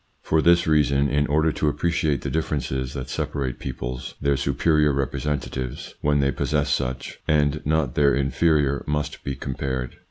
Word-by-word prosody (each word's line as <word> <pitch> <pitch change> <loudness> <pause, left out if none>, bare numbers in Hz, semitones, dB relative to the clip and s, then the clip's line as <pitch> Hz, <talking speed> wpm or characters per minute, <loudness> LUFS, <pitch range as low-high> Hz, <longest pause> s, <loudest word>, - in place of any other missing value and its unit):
For 80 - +2
this 85 +1 +4
reason, 70 -2 +3
in 75 0 +1
order 80 +2 +2
to 75 - -1
appreciate 75 -2 0
the - - -4
differences 65 -4 -2
that 65 -2 -4
separate 65 0 -3
peoples, 60 0 -5
their 70 0 +2
superior 75 +3 +2
representatives 65 -1 -3
when 75 -1 +2
they 70 0 +2
possess 70 +1 0
such 65 +1 -2
and 75 -1 +2
not 75 -5 +1
their 70 0 +4
inferior 70 +1 +2
must 75 0 -2
be 70 - -3
compared. 65 -1 -4
70 Hz, 155 wpm, -24 LUFS, 65-75 Hz, -, this